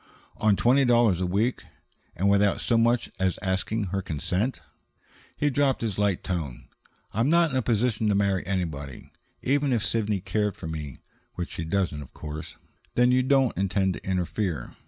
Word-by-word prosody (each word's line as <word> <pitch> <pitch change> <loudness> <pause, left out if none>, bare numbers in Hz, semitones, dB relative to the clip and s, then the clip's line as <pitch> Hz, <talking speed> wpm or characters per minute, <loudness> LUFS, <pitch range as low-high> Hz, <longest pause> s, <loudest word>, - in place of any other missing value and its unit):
"On 105 -1 +3
twenty 130 +6 +4
dollars 120 -7 +4
a 90 - 0
week? 105 +7 0 0.5
And 95 +4 0
without 100 0 +3
so 115 - +1
much 115 +1 +2
as 95 -1 +1
asking 95 +4 -1
her 100 - 0
consent?" 95 - -2 0.8
He 145 -1 +1
dropped 135 0 +1
his 105 -4 -2
light 100 -3 +1
tone. 80 -9 -4 0.5
"I'm 115 +6 +1
not 170 -1 +4
in 130 - 0
a - - +2
position 115 -1 +1
to 100 - +2
marry 100 -2 +1
anybody. 80 -8 -4 0.3
Even 140 +1 +2
if 115 -4 +1
Sidney 105 -3 0
cared 105 +2 -1
for - - -9
me, 75 -4 -6 0.3
which 90 -1 -4
she 80 - -4
doesn't, 85 -4 -1
of 70 - -12
course 75 0 -7 0.2
" - - -35
"Then 125 +1 +4
you 130 0 +4
don't 135 -1 +2
intend 95 0 +1
to - - -9
interfere? 90 -2 -2
100 Hz, 175 wpm, -26 LUFS, 90-120 Hz, 0.8 s, twenty